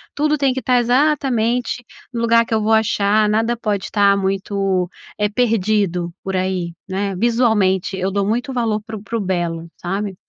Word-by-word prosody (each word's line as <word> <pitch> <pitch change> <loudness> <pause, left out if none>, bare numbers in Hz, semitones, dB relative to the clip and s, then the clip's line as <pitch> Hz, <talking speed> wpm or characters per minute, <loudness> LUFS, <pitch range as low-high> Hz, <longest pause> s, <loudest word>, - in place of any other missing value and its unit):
Tudo 300 +1 +1
tem 275 -2 +2
que 260 - -2
estar 250 -1 +3
exatamente 245 -2 +1 0.3
no 235 - -2
lugar 230 0 +4
que - - -4
eu 220 - +2
vou 220 +1 0
achar. 215 -1 +3
Nada 225 +3 +1
pode 210 -4 -2
estar 200 -1 +3
muito, 195 -1 -1 0.3
eh, 210 0 +1
perdido 205 -6 +1
por 190 0 -3
aí, 185 -2 -1
né? 195 +1 -2
Visualmente, 210 -4 +1
eu 190 +1 -1
dou 200 0 0
muito 245 +6 -1
valor 225 -4 0
pro 220 -2 -7
pro 230 +3 -3
belo, 170 -3 -2
sabe? 195 +2 -3
210 Hz, 170 wpm, -19 LUFS, 190-235 Hz, 0.3 s, lugar